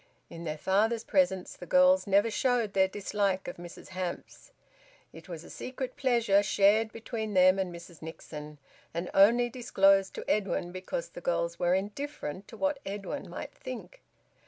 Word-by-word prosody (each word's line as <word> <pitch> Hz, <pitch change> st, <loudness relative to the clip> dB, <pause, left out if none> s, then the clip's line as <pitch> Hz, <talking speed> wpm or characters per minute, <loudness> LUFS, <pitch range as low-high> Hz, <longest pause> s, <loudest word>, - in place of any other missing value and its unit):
In 170 Hz, 0 st, -8 dB
their 155 Hz, -1 st, -3 dB
father's 220 Hz, +7 st, +1 dB
presence 230 Hz, -12 st, +1 dB
the 180 Hz, -, -10 dB
girls 275 Hz, -2 st, +5 dB
never 200 Hz, +3 st, +3 dB
showed 240 Hz, -3 st, +1 dB
their 190 Hz, 0 st, +4 dB
dislike 200 Hz, -1 st, -1 dB
of 175 Hz, -, -6 dB
Mrs 175 Hz, 0 st, -11 dB
Hamps; 185 Hz, -, -6 dB, 0.6 s
it -, -, -13 dB
was 165 Hz, -2 st, -7 dB
a -, -, -13 dB
secret 255 Hz, 0 st, -5 dB
pleasure 235 Hz, -7 st, +3 dB
shared 205 Hz, +2 st, +3 dB
between 220 Hz, -2 st, -5 dB
them 185 Hz, +1 st, +6 dB
and 185 Hz, -2 st, -1 dB
Mrs 170 Hz, -1 st, -11 dB
Nixon, 150 Hz, -2 st, -8 dB, 0.4 s
and 170 Hz, +2 st, -3 dB
only 235 Hz, +5 st, +6 dB
disclosed 195 Hz, -6 st, +3 dB
to -, -, -7 dB
Edwin 195 Hz, -4 st, 0 dB
because 185 Hz, -2 st, -4 dB
the -, -, -10 dB
girls 170 Hz, 0 st, -1 dB
were 175 Hz, +1 st, +3 dB
indifferent 200 Hz, -, -4 dB
to 225 Hz, -, -11 dB
what 285 Hz, +1 st, 0 dB
Edwin 200 Hz, +8 st, -5 dB
might -, -, -7 dB
think. -, -, -9 dB
195 Hz, 160 wpm, -29 LUFS, 180-230 Hz, 0.6 s, them